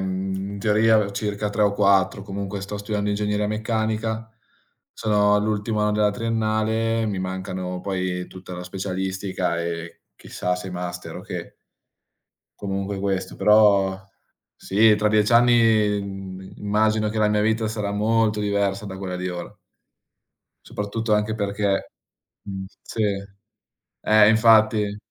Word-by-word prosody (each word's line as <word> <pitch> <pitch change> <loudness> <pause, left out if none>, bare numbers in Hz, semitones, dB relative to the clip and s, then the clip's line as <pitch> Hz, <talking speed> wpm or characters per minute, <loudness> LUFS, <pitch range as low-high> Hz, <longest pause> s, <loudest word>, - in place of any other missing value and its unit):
mhmm, 95 0 -2 0.2
in 100 - -6
teoria 110 -1 +3
circa 105 0 -2
3 105 +1 0
o 100 - +3
4, 100 -1 +2
comunque 100 0 -5
sto 105 +1 -5
studiando 105 0 -2
ingegneria 105 0 0
meccanica, 110 0 -2 0.6
sono 105 -2 +2
all'ultimo 105 +1 -1
anno 105 0 +2
della 105 0 +2
triennale, 110 +1 0
mi 100 -3 -2
mancano 95 -1 -4
poi 90 -2 -3
tutta 95 0 -11
la 90 0 -6
specialistica 95 -1 -3
e 85 0 -5 0.2
chissà 90 0 -3
se 95 +1 -7
master 90 0 -6
o - - -8
che. - - -6 1.1
Comunque 100 0 -3
questo. 95 -1 -2
Però 100 -3 +4 0.6
sì, 105 +2 +4
tra 105 0 +1
10 105 +1 +2
anni, 115 -3 +4
mhmm, 95 -1 -8
immagino 110 +1 +1
che 110 - -5
la 105 -1 +3
mia 105 0 +2
vita 110 +1 +1
sarà 105 -2 -3
molto 110 +1 +1
diversa 100 -1 0
da 95 -2 -7
quella 90 -2 -4
di 90 0 -3
ora. 90 -1 -6 1.2
Soprattutto 105 +2 -2
anche 105 +1 0
perché 100 -2 -1 0.5
mhmm, 95 -1 -6 0.2
sì. 115 - -5 1.1
Eh, 105 -1 +7
infatti. 110 -2 +4
105 Hz, 135 wpm, -23 LUFS, 95-110 Hz, 1.2 s, Eh